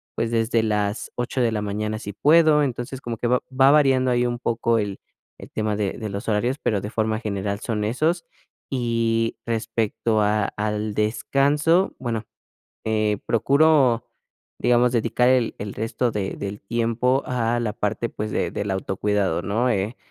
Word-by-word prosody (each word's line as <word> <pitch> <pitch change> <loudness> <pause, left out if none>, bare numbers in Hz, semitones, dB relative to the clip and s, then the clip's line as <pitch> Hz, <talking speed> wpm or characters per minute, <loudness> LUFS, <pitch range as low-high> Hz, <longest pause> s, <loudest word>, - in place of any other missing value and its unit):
pues, 115 - -1
desde 115 0 +2
las 105 -1 -1
8 120 +1 -2
de 115 -2 +2
la 105 -1 -2
mañana 105 +1 -2
si 100 -2 -7
puedo. 155 +4 +5
Entonces, 130 0 -4
como 115 -2 -5
que 120 - -1
va 125 +1 +3
va 135 +1 +5
variando 135 -4 +4
ahí 120 0 +2
un 120 0 -2
poco 115 -1 +1
el 100 -2 -2 0.4
el - - -11
tema 110 -1 -1
de 100 -2 -1
de 110 -2 -5
los 100 +2 -6
horarios, 120 +6 +1
pero 105 -4 0
de 105 - -6
forma 110 -1 0
general 100 -2 -3
son 110 -3 -2
esos. 155 - 0 0.4
Y 115 -3 0
respecto 115 -1 0
a 105 0 +2
al 105 0 -2
descanso, 145 - +2
bueno, 115 -3 -3 0.6
eh, 110 -2 +1
procuro, 135 -1 +3 0.5
digamos, 120 +1 +3
dedicar 125 +2 +2
el 125 -3 +2
el 100 -1 -5
resto 115 +2 -1
de 100 -2 -2
del 100 +1 -6
tiempo 120 +5 0
a 120 -1 0
la 110 -3 -2
parte, 110 +3 -2
pues, 105 0 -5
de - - -1
del 100 -1 -3
autocuidado, 95 -2 0
¿no? 115 +5 0
Eh, 105 +2 -1
115 Hz, 165 wpm, -23 LUFS, 105-125 Hz, 0.6 s, puedo